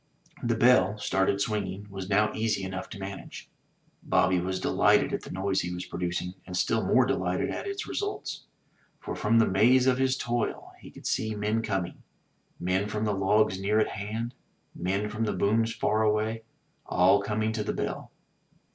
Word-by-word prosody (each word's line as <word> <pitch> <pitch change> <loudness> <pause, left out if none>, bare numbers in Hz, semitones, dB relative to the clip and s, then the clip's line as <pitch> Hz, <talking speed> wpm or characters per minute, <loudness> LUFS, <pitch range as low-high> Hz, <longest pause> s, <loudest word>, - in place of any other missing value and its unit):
The 120 -1 +1
bell, 115 -3 +4
started 100 -1 +1
swinging, 100 -2 -2
was 95 -1 -6
now 105 +2 +3
easy 110 -3 0
enough 95 0 -5
to 105 - -8
manage. 95 0 -8 0.5
Bobby 90 0 +2
was 95 +1 -2
delighted - - +3
at - - -1
the - - -10
noise 95 +1 0
he 90 - -4
was 90 0 -5
producing, 90 0 -3
and 90 -1 -4
still 110 +4 +1
more 130 - +4
delighted 95 -9 0
at - - -4
its 395 +2 -4
results. 410 0 -4 0.5
For - - -5
from 115 +2 +2
the 115 - +6
maze 125 +7 +4
of 130 -1 +3
his 130 -1 +2
toil 120 -2 -2
he - - -12
could - - -14
see 110 -1 -1
men 105 +2 0
coming 95 -5 -3 0.3
— - - -41
men 95 +2 +1
from 105 +1 -2
the 105 - +1
logs 100 0 +2
near 105 +2 +2
at 110 - +2
hand, 110 +4 -4 0.4
men 95 +4 -1
from 110 +2 -3
the 105 - -1
booms 115 +3 +2
far 110 -1 0
away 110 +1 0 0.2
— - - -42
all 95 +3 +4
coming 110 +2 -1
to 110 -1 -2
the - - -2
bell. - - -4
105 Hz, 185 wpm, -28 LUFS, 95-115 Hz, 0.5 s, the